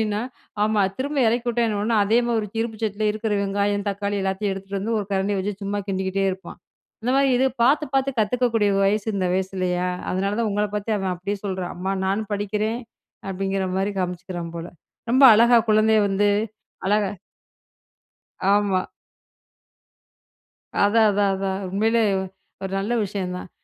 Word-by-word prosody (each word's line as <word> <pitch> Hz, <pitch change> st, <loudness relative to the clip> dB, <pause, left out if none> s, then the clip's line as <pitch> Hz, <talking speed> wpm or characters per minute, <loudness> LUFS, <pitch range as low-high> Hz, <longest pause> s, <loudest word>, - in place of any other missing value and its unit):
அப்டின்னா, 210 Hz, -1 st, 0 dB, 0.4 s
ஆமா 210 Hz, -1 st, +2 dB, 0.2 s
திரும்ப 285 Hz, +3 st, -2 dB
இறக்கி 240 Hz, +2 st, 0 dB
விட்டா 240 Hz, 0 st, +1 dB
என்ன 210 Hz, -1 st, -1 dB
உடனே 220 Hz, +1 st, +1 dB
அதே 225 Hz, +4 st, +3 dB
மாரி 235 Hz, -1 st, +1 dB
ஒரு 210 Hz, -, -5 dB
இருப்பு 225 Hz, -1 st, -3 dB
சட்டில 215 Hz, 0 st, -1 dB
இருக்கிற 215 Hz, 0 st, -2 dB
வெங்காயம், 200 Hz, +1 st, 0 dB
தக்காளி 200 Hz, +1 st, -2 dB
எல்லாத்தையும் 195 Hz, +1 st, -1 dB
எடுத்துகிட்டு 195 Hz, +1 st, -5 dB
வந்து 225 Hz, +2 st, -1 dB
ஒரு 200 Hz, -, -5 dB
கரண்டிய 195 Hz, +1 st, 0 dB
வச்சு 205 Hz, +2 st, -2 dB
சும்மா 205 Hz, +1 st, -2 dB
கிண்டிக்கிட்டே 190 Hz, 0 st, -1 dB
இருப்பான். 190 Hz, +1 st, -10 dB, 0.4 s
அந்த 245 Hz, -, 0 dB
மாரி 275 Hz, 0 st, +4 dB
இது 255 Hz, -, +2 dB, 0.2 s
பார்த்து 290 Hz, +5 st, +4 dB
பார்த்து 270 Hz, 0 st, +2 dB
கத்துக்கக்கூடிய 225 Hz, -1 st, +2 dB
வயசு 210 Hz, +2 st, +1 dB
இந்த 185 Hz, -2 st, 0 dB
வயசுல்லையா? 185 Hz, -1 st, -1 dB, 0.2 s
அதனால 195 Hz, +2 st, -1 dB
தான் 225 Hz, -, +1 dB
உங்கள 210 Hz, +1 st, +1 dB
பார்த்து 210 Hz, +1 st, -1 dB
அவன் 190 Hz, -1 st, -1 dB
அப்டியே 200 Hz, +3 st, -4 dB
சொல்றான். 185 Hz, -3 st, -3 dB
அம்மா 190 Hz, +2 st, -2 dB
நானும் 210 Hz, +2 st, -1 dB
படிக்கிறேன் 210 Hz, +3 st, -2 dB, 0.5 s
அப்டிங்கிற 195 Hz, 0 st, -1 dB
மாரி 195 Hz, +2 st, 0 dB
காமிச்சிக்கிறான் 180 Hz, -1 st, -4 dB
போல. 170 Hz, +1 st, -6 dB, 0.4 s
ரொம்ப 265 Hz, +2 st, +6 dB
அழகா 235 Hz, +2 st, +6 dB
குழந்தையை 215 Hz, 0 st, +4 dB
வந்து 200 Hz, +1 st, +2 dB, 0.6 s
அழகா 205 Hz, -1 st, +2 dB, 1.4 s
ஆமா. 200 Hz, -3 st, +1 dB, 2.0 s
அதான். 220 Hz, +2 st, +4 dB
அதான். 200 Hz, 0 st, +2 dB
அதான். 195 Hz, 0 st, -2 dB
உண்மையிலே 225 Hz, +4 st, +2 dB, 0.6 s
ஒரு 190 Hz, -, -3 dB
நல்ல 205 Hz, +5 st, -2 dB
விஷயம் 190 Hz, -2 st, -4 dB
தான். 180 Hz, -, -8 dB
205 Hz, 155 wpm, -23 LUFS, 190-220 Hz, 2.0 s, ரொம்ப